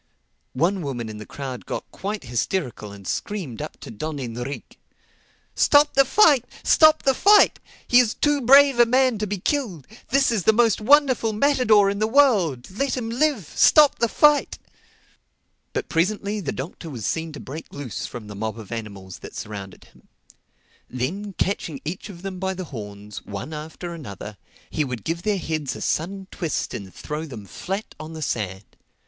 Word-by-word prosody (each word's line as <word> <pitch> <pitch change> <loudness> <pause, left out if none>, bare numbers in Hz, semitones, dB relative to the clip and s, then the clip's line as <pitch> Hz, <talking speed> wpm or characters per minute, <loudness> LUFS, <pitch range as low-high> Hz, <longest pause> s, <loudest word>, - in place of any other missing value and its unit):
One 180 +8 +1
woman 125 -7 -4
in 105 -1 -8
the 110 - -9
crowd 130 -3 -7
got - - -5
quite 205 +2 -4
hysterical 120 - -3
and 100 -2 -11
screamed 180 - -4
up - - -7
to - - -8
Don 150 +8 -5
Enrique, 125 +1 -6 0.8
"Stop 290 0 +4
the 275 0 +5
fight! 290 - +5 0.2
Stop 310 -1 +5
the 270 - +4
fight! 410 +9 +5 0.3
He 245 - +6
is 235 -3 +2
too 295 -1 +1
brave 275 +1 +6
a 240 - +7
man 255 -2 +3
to 210 - -1
be 205 +1 -2
killed. 195 - -2 0.2
This 270 0 +3
is 220 -4 +1
the 220 - +6
most 230 -3 +3
wonderful 255 -2 +4
matador 215 -4 +4
in 200 - -4
the 215 - +2
world. 205 - +3
Let 265 +7 -1
him 230 -2 -3
live! 245 - 0
Stop 300 -2 +6
the 235 - +3
fight!" 295 +5 +3 1.1
But - - -3
presently 200 +5 0
the 160 -9 -3
Doctor 160 +4 -7
was 120 -8 -6
seen 160 0 -2
to 145 - -8
break 155 +5 -8
loose 140 -8 -5
from 120 -3 -8
the 105 - -9
mob 110 +2 -4
of 110 -4 -10
animals 100 -5 -7
that - - -11
surrounded 100 -3 -7
him. - - -23 0.8
Then 185 +12 -4
catching 170 -7 -2
each 180 +7 -5
of 180 -2 -11
them 190 -2 -5
by 190 0 -2
the 185 - -5
horns, 105 -6 -8
one 100 +10 -7
after 160 +3 -7
another, 105 - -8 0.3
he 155 - 0
would 125 -6 -5
give 170 +1 -2
their 210 +1 0
heads 155 -5 -3
a - - -7
sudden 190 +4 -2
twist 165 -5 -3
and 95 -2 -7
throw 150 - -6
them 120 -7 -8
down 100 - -16
flat 195 +4 -4
on 155 +1 -8
the 160 -1 -5
sand. 95 -6 -3
175 Hz, 180 wpm, -23 LUFS, -, 1.1 s, a